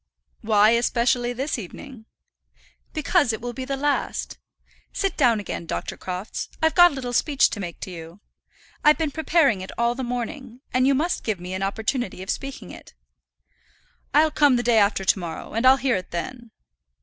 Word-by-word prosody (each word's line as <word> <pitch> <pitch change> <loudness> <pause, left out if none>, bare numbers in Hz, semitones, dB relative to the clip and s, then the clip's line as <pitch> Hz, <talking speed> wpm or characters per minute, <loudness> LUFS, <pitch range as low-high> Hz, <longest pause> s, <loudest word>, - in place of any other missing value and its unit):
"Why 215 0 +4
especially 240 +1 +1
this 260 +2 -3
evening?" 225 - -10 0.9
"Because 310 -3 +2
it 220 - -4
will 240 +1 -5
be 260 +2 -5
the 275 +1 -3
last. 290 +1 -2 0.5
Sit 390 - -2
down 240 -7 +3
again, 175 -4 -6
Dr. - - -4
Crofts. 185 +3 -5
I've 320 0 +2
got 350 -1 +8
a 285 - -8
little 250 -2 -5
speech 280 +2 +3
to 210 - -5
make 175 -4 -6
to 185 - -6
you. 165 +2 -10 0.6
I've 300 0 +6
been 315 -3 -1
preparing 305 - +2
it 190 - -7
all 235 0 +2
the 260 - -6
morning, 245 +1 -5
and 255 +1 +3
you 275 - +4
must 330 +6 -1
give 215 -5 -2
me 180 +1 -7
an 190 - -3
opportunity 205 0 -2
of 190 - -2
speaking 275 0 -6
it." - - -13 1.2
"I'll 310 +1 +4
come 290 -4 +4
the 240 - 0
day 235 -2 +4
after 200 -1 +2
to 190 - +3
morrow, 170 -2 -7
and 230 +4 +2
I'll 265 +1 +7
hear 260 -3 +1
it 185 - -7
then." 235 +7 -6
245 Hz, 185 wpm, -24 LUFS, 205-275 Hz, 1.2 s, got